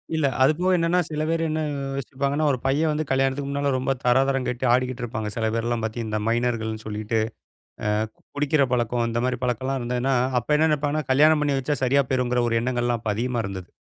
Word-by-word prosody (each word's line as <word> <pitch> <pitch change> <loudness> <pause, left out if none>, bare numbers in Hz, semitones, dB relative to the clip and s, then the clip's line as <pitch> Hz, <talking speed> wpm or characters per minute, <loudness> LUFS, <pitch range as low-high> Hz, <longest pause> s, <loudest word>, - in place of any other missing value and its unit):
இல்ல 155 -2 +1 0.2
அது 135 - +6
போக 185 - +1
என்னன்னா, 170 +2 +2
சில 155 0 -3
பேர் 165 0 +1
என்ன 155 0 -1 0.3
யோசிப்பாங்கன்னா, 140 +3 -1
ஒரு 130 - -1
பைய 140 +4 +2
வந்து 150 +1 -1
கல்யாணத்துக்கு 135 +1 +1
முன்னால 140 0 0
ரொம்ப 130 +1 0
தராதரங்கட்டு 130 0 +1
ஆடிக்கிட்டு 125 -1 0
இருப்பாங்க. 110 -2 -3
சில 110 -1 0
பேர்லா 120 +1 0
பாத்திங் 110 +1 -3
இந்த 110 0 -1
மைனர்கள்னு 115 -2 -1
சொல்லிட்டு 110 +1 -2 0.7
அ - - +1 0.5
குடிக்கற 145 0 +2
பழக்கம் 120 0 +1
அந்த 115 0 -1
மாரிப் 125 -1 -2
பழக்கலா 130 +2 -1
இருந்ததுன்னா, 125 +2 0 0.3
அப்ப 150 +6 +1
என்ன 160 +1 +3
நெனைப்பாங்கனா? 150 0 0
கல்யாணம் 150 +3 +5
பண்ணி 140 -2 +1
வச்சா 145 +3 -1
சரியா 140 +2 +4
போயிருங்கற 125 -1 +1
ஒரு 115 - +1
எண்ணங்கள்லா 120 -1 0
அப்ப 110 - -2
அதிகமா 120 0 -1
இருந்தது. 95 -2 -7
130 Hz, 185 wpm, -24 LUFS, 120-140 Hz, 0.7 s, அது